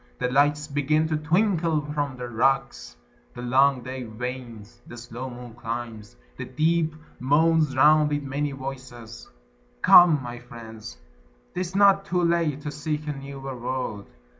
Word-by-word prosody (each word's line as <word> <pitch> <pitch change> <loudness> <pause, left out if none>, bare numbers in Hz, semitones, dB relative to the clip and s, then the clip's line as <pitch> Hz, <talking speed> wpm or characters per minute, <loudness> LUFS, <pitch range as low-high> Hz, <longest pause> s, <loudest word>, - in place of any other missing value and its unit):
The 125 - -2
lights 145 +2 +2
begin 150 +2 +1
to 155 - 0
twinkle 165 0 +1
from 145 -3 -2
the 125 0 -5
rocks: 120 - -1 0.4
The 120 - -7
long 130 +1 +3
day 130 +1 -6
wanes: 120 -1 -8
the 120 - -10
slow 120 +2 -7
moon 120 -1 -10
climbs: 115 -2 -6 0.2
the - - -5
deep 160 +3 0 0.2
Moans 150 +2 +2
round 150 +2 +5
with 145 -1 -2
many 140 +1 -2
voices. 130 -4 -9 0.5
Come, 170 -4 +8
my 120 0 -7
friends, 115 -1 -11 0.6
'T 180 - -3
is 185 +1 -5
not 195 -1 +5
too 180 -1 0
late 170 -4 +1
to 150 0 -5
seek 150 0 -4
a 150 - -1
newer 135 -1 -7
world. 125 -4 -4
135 Hz, 150 wpm, -25 LUFS, 120-155 Hz, 0.6 s, Come